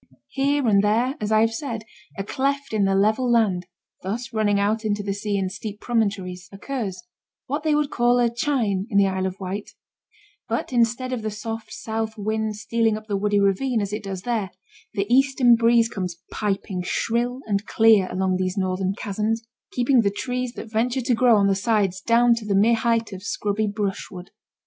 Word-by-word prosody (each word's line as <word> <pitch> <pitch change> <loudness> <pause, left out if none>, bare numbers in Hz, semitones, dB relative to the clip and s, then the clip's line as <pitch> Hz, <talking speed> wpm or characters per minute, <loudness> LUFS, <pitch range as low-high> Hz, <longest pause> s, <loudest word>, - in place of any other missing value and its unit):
Here 280 -1 +1
and 200 -2 +4
there, 235 +6 +2
as 210 0 -2
I 215 0 +5
have 225 0 +2
said, 230 -3 -4 0.3
a 195 - -2
cleft 275 +4 -2
in 210 -2 +2
the 195 0 +2
level 220 +5 +2
land 195 -7 +2 0.3
(thus 230 +5 -4
running 205 -2 +2
out 215 +3 +1
into 205 -1 -1
the 200 -1 -2
sea 205 0 -2
in 190 -1 0
steep 205 +2 -7
promontories) 195 -6 -2
occurs 195 -4 -5 0.4
what 290 +4 -2
they 305 -1 +2
would 295 -1 0
call 240 0 +3
a 240 -1 +4
'chine' 235 -6 0
in 200 - 0
the 200 - +6
Isle 190 -1 0
of 190 +1 -7
Wight; 195 +2 -5 0.7
but 230 +3 -2
instead 245 +2 +1
of 245 - -2
the 215 - -2
soft 225 +1 -6
south 220 0 -4
wind 215 +1 -2
stealing 225 0 0
up 215 - -10
the 205 -2 -2
woody 205 +1 +1
ravine, 210 +5 +1
as 200 -1 -3
it 210 - -3
does 190 -2 -5
there, 225 -5 -1 0.5
the 200 -1 0
eastern 260 -1 +4
breeze 230 0 +4
comes 180 -6 -4
piping 195 -3 -2
shrill 240 +7 -1
and 205 0 -1
clear 220 -4 +5
along 185 0 0
these 185 +1 -2
northern 190 0 -1
chasms, 215 +3 -2 0.3
keeping 250 0 +3
the 200 - +2
trees 250 +4 -3
that - - -7
venture 240 +4 0
to 250 +1 +1
grow 240 0 +5
on 200 -1 +3
the 200 - +3
sides 195 -2 0
down 235 +2 +4
to 230 -2 -4
the 200 - +1
mere 215 +4 +5
height 230 -1 0
of 190 - -7
scrubby 205 +2 -1
brushwood. 200 -3 -4
215 Hz, 195 wpm, -23 LUFS, 200-235 Hz, 0.7 s, the